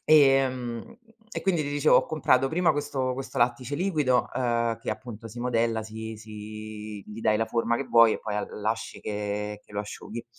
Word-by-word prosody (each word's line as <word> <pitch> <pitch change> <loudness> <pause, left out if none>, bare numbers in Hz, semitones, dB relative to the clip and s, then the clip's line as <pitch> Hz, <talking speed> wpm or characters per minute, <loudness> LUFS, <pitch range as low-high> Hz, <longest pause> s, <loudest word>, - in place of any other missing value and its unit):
Ehm, 135 - +3 0.3
e - - -4
quindi 175 -5 +2
ti 145 - -3
dicevo, 145 +1 +3
ho - - +3
comprato 135 -4 +3
prima 175 +2 +3
questo 140 -3 -1
questo 135 0 -5
lattice 125 +3 +1
liquido, 150 -9 +2
uhm, 120 -2 +1
che - - -4
appunto 110 +1 -7
si 115 - -10
modella, 115 -2 +1
si 110 0 -6
si 110 0 -8
gli 105 +2 -9
dai 110 -1 +3
la 115 - +1
forma 115 +1 +1
che 140 - -2
vuoi, 115 -2 +6
e - - -4
poi 105 -1 -4
l 105 - -2
lasci 110 0 -2
che 105 0 -3
lo 100 - -5
asciughi. 110 +2 -6
115 Hz, 185 wpm, -27 LUFS, 110-135 Hz, 0.3 s, vuoi